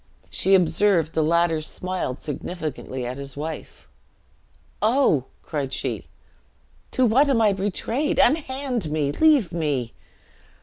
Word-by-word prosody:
She 195 +1 +3
observed 175 -1 +2
the 160 - +1
latter 165 0 +2
smiled 180 -4 -3
significantly 150 -4 -5
at 125 +3 -5
his 140 0 -7
wife. 155 +2 -7 0.9
"Oh!" 215 - +3 0.2
cried 140 -4 -3
she, - - -3 0.8
"to 255 - +2
what 265 +6 +4
am 260 -4 +3
I 215 -3 +4
betrayed? 205 +8 -1
Unhand 265 - +1
me! 150 -2 0
Leave 290 - +3
me!" 145 -8 -1
170 Hz, 120 wpm, -23 LUFS, 150-230 Hz, 0.9 s, what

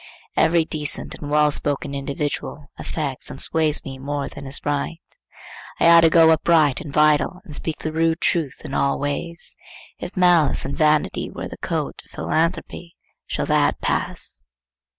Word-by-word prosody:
Every 165 -1 +3
decent 150 -2 -2
and 145 - -7
well 150 0 +4
spoken 145 -1 -2
individual 140 +1 -4
affects 140 -5 -4
and 135 - -8
sways 160 -1 0
me 135 -1 -7
more 140 +1 -3
than 140 - -9
is 135 - -3
right. 145 +3 -1 0.8
I - - +4
ought 170 0 +8
to 165 - +6
go 160 0 +6
upright 160 -3 +3
and 145 - -7
vital, 150 +4 +3
and 155 - -10
speak 155 +1 -3
the 155 - -4
rude 165 +1 +1
truth 160 -6 0
in - - -6
all 140 - +1
ways. 155 +4 -3 0.4
If - - -7
malice 175 -5 +4
and 140 - -3
vanity 155 -1 +1
wear - - -6
the - - -9
coat - - -3
of - - -21
philanthropy, 170 +1 -2 0.3
shall - - -2
that - - +2
pass? - - -3
150 Hz, 165 wpm, -22 LUFS, 145-165 Hz, 0.8 s, ought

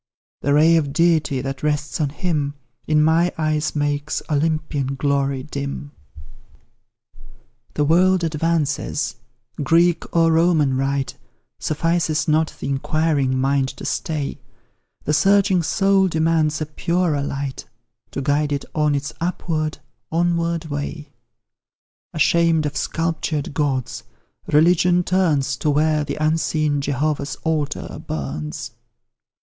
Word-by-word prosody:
The 140 0 +2
ray 160 +3 +5
of 145 -3 0
Deity 160 -5 +2
that 135 0 -5
rests 150 +1 -1
on 145 - +1
him, 150 -3 -2 0.3
In 150 -1 +3
my 165 +3 +3
eyes 155 -1 0
makes 145 0 -1
Olympian 150 -3 0
glory 140 -1 0
dim. 140 0 -5 1.8
The 150 - +2
world 180 +4 +3
advances; 155 -4 -1 0.4
Greek 170 +4 +2
or 165 -1 +4
Roman 160 -5 +3
rite 135 +1 -1 0.4
Suffices 160 0 0
not 155 +1 +2
the - - -4
inquiring 140 -1 0
mind 135 0 +2
to - - -8
stay; 150 -3 -3 0.6
The 150 - 0
searching 195 +3 +4
soul 195 +3 +3
demands 160 -2 +1
a - - 0
purer 165 0 0
light 140 -1 -4 0.4
To 140 - -4
guide 145 +1 +1
it 140 -1 -2
on 150 -2 +2
its 140 0 -3
upward, 160 -3 -2 0.3
onward 170 0 0
way; 145 0 -5 1.0
Ashamed 165 0 +3
of 145 - -3
sculptured 160 -3 -2
gods, 135 -5 -1 0.5
Religion 175 +3 +4
turns 155 -8 +1
To 150 - -1
where 150 +1 +2
the 140 -1 -4
unseen 155 -2 +1
Jehovah's 140 +1 -1
altar 155 -3 -2
burns. 75 0 -4
150 Hz, 115 wpm, -21 LUFS, 140-165 Hz, 1.8 s, ray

